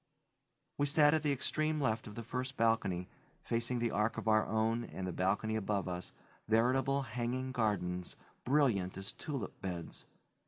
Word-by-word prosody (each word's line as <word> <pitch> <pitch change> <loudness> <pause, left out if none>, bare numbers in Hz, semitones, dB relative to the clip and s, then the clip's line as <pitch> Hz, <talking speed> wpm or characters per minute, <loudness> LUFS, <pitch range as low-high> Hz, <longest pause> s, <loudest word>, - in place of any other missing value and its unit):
We 145 - +3
sat 150 +1 +5
at 160 - +3
the 150 -1 +1
extreme 155 +3 0
left 115 -5 0
of 105 - -9
the 115 - -5
first 130 +3 -3
balcony, 105 -6 +2 0.4
facing 120 +1 -1
the 120 -1 0
arch 105 +2 +1
of - - -4
our 110 -1 +4
own 110 +2 +1
and 95 -4 -6
the 90 - -2
balcony 100 +5 +1
above 100 -2 -1
us, 90 0 -4 0.4
veritable 130 +5 +3
hanging 125 +2 -2
gardens, 95 -7 -1 0.3
brilliant 120 -11 +2
as 95 0 -4
tulip 140 -7 -5
beds. 90 -3 -5
115 Hz, 160 wpm, -34 LUFS, 100-130 Hz, 0.4 s, sat